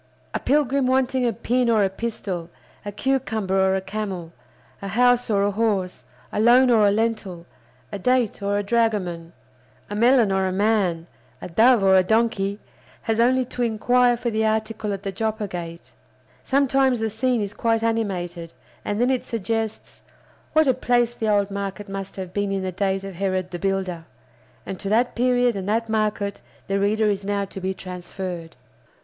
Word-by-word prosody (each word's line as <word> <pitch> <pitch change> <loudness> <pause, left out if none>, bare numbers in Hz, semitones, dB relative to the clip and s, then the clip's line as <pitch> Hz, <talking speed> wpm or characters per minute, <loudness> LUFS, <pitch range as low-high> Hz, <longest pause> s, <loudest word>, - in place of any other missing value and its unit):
A - - -1
pilgrim 275 -1 +1
wanting 260 -1 +1
a - - +2
pin 245 +3 0
or 220 -3 +4
a 195 - +2
pistol, 190 -5 -4 0.3
a 205 - -5
cucumber 220 -5 -1
or 190 0 +3
a 190 - -1
camel, 190 -4 -5 0.5
a 200 - -5
house 245 +4 +3
or 200 -2 +2
a 205 - +1
horse, 200 -4 -1 0.3
a - - -2
loan 245 +3 +6
or 215 -3 +5
a - - +4
lentil, 205 -5 -2 0.5
a 200 - -5
date 250 -1 +1
or 200 0 0
a 205 - -1
dragoman, 200 -7 0 0.6
a - - -3
melon 235 -1 +4
or 190 0 +1
a - - -1
man, 190 -4 +1 0.3
a - - -7
dove 225 +5 +4
or 190 0 +5
a 190 - +7
donkey, 205 -1 +1 0.5
has 225 0 -1
only 255 +2 +3
to 245 - -6
inquire 245 +2 +3
for 235 0 -2
the 220 0 0
article 220 -1 -1
at 195 0 -4
the 195 - -3
Joppa 220 +1 -2
Gate. 170 -2 -8 0.5
Sometimes 270 -2 +2
the 220 - 0
scene 245 +2 0
is 200 0 -5
quite 225 0 0
animated, 180 -7 -2 0.3
and 205 +1 -2
then 245 +2 +3
it 255 - 0
suggests, 225 0 -4 0.5
What 315 0 +5
a 260 - +5
place 240 -1 +1
the 220 -2 -2
old 205 -1 +2
market 200 +1 -5
must 195 0 -6
have 185 -2 -7
been 205 -1 -1
in 195 -1 -1
the 185 - -2
days 195 +1 -1
of 195 -1 -7
Herod 185 0 -2
the 175 - -5
Builder! 190 -3 -2 0.6
And 190 - -6
to 195 - -4
that 235 +4 +2
period 245 -1 +2
and 195 0 -4
that 225 +1 0
market 210 -2 -1 0.2
the 195 0 -1
reader 215 +2 +2
is 200 -1 0
now 200 0 -1
to 195 0 -9
be 190 +1 -2
transferred. 180 -2 -7
210 Hz, 185 wpm, -23 LUFS, 190-235 Hz, 0.6 s, a